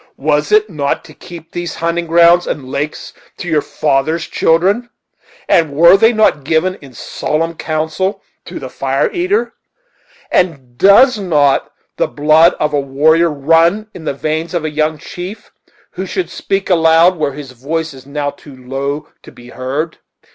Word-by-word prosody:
Was 150 Hz, +1 st, 0 dB
it 215 Hz, 0 st, +4 dB
not 145 Hz, -7 st, -3 dB
to 155 Hz, -, -14 dB
keep 170 Hz, 0 st, -12 dB
these 175 Hz, -1 st, -5 dB
hunting 170 Hz, +1 st, -2 dB
grounds 170 Hz, +1 st, +4 dB
and 135 Hz, -3 st, -4 dB
lakes 145 Hz, +3 st, -5 dB, 0.2 s
to 180 Hz, -, -7 dB
your 155 Hz, -3 st, +1 dB
father's 155 Hz, +4 st, -1 dB
children? 195 Hz, +9 st, +1 dB, 0.6 s
and 160 Hz, -3 st, +3 dB
were 170 Hz, +5 st, +6 dB
they 225 Hz, +4 st, +4 dB
not 215 Hz, -, +2 dB
given 160 Hz, +5 st, +1 dB
in 140 Hz, -2 st, -13 dB
solemn 165 Hz, +5 st, -3 dB
council 160 Hz, +5 st, -3 dB, 0.2 s
to -, -, -8 dB
the 130 Hz, -, -6 dB
Fire 135 Hz, 0 st, -1 dB
eater? 375 Hz, +5 st, -1 dB, 0.8 s
and 135 Hz, -9 st, -1 dB
does 210 Hz, -, +5 dB
not 150 Hz, -8 st, +1 dB, 0.3 s
the -, -, +1 dB
blood 155 Hz, +3 st, +4 dB
of 150 Hz, 0 st, 0 dB
a 145 Hz, -, +2 dB
warrior 155 Hz, +5 st, +2 dB
run 165 Hz, +8 st, +2 dB
in 165 Hz, -, -10 dB
the -, -, -1 dB
veins 160 Hz, +4 st, -3 dB
of 165 Hz, -2 st, -1 dB
a 155 Hz, -, -2 dB
young 155 Hz, +1 st, 0 dB
chief, 180 Hz, +6 st, -9 dB, 0.4 s
who -, -, -6 dB
should 370 Hz, -, -3 dB
speak 195 Hz, 0 st, -2 dB
aloud 165 Hz, +1 st, +4 dB
where 150 Hz, -3 st, -1 dB
his 140 Hz, -2 st, -9 dB
voice 155 Hz, +6 st, -4 dB
is 130 Hz, -1 st, -13 dB
now 145 Hz, 0 st, -3 dB
too 140 Hz, -1 st, -15 dB
low 135 Hz, +3 st, -4 dB
to -, -, -14 dB
be 120 Hz, 0 st, -15 dB
heard?" 140 Hz, +6 st, -4 dB
160 Hz, 165 wpm, -15 LUFS, 145-175 Hz, 0.8 s, were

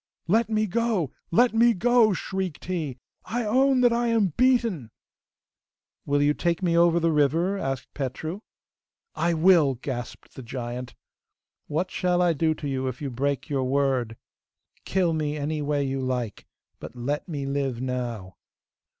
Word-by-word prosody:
'Let 220 Hz, +5 st, +2 dB
me 215 Hz, -1 st, +1 dB
go! 215 Hz, -, 0 dB, 0.2 s
let 240 Hz, +8 st, +4 dB
me 230 Hz, 0 st, +4 dB
go!' 235 Hz, +2 st, +4 dB
shrieked 190 Hz, -2 st, -4 dB
he. 160 Hz, -8 st, -3 dB, 0.3 s
'I 240 Hz, 0 st, -2 dB
own 260 Hz, +4 st, +3 dB
that 245 Hz, -1 st, +5 dB
I 235 Hz, 0 st, +1 dB
am 220 Hz, -7 st, +2 dB
beaten!' 235 Hz, -, +2 dB, 1.2 s
'Will 145 Hz, 0 st, +2 dB
you 145 Hz, +1 st, +3 dB
take 170 Hz, +3 st, -1 dB
me 170 Hz, -2 st, +2 dB
over 170 Hz, 0 st, +4 dB
the 165 Hz, 0 st, +2 dB
river?' 160 Hz, +6 st, +2 dB
asked 135 Hz, -5 st, -4 dB
Petru. 155 Hz, +7 st, -4 dB, 0.7 s
'I 170 Hz, 0 st, 0 dB
will,' 160 Hz, -5 st, +5 dB
gasped 120 Hz, -1 st, -7 dB
the -, -, -9 dB
giant. 125 Hz, 0 st, -6 dB, 0.7 s
'What 175 Hz, +5 st, -2 dB
shall 180 Hz, -1 st, +1 dB
I 175 Hz, -1 st, +3 dB
do 160 Hz, +1 st, +1 dB
to 150 Hz, -, -6 dB
you 130 Hz, -1 st, -2 dB
if 130 Hz, -1 st, -4 dB
you 140 Hz, -3 st, -4 dB
break 140 Hz, +3 st, -2 dB
your 135 Hz, -3 st, -1 dB
word?' 130 Hz, -4 st, 0 dB, 0.7 s
'Kill 180 Hz, -3 st, +1 dB
me, 150 Hz, -1 st, -1 dB
any 150 Hz, +1 st, -2 dB
way 145 Hz, -1 st, 0 dB
you 135 Hz, 0 st, -2 dB
like! 125 Hz, -4 st, -3 dB, 0.3 s
But -, -, -9 dB
let 140 Hz, +7 st, -3 dB
me 145 Hz, -4 st, -3 dB
live 135 Hz, -3 st, -2 dB
now. 120 Hz, -7 st, -4 dB
155 Hz, 160 wpm, -25 LUFS, 135-190 Hz, 1.2 s, that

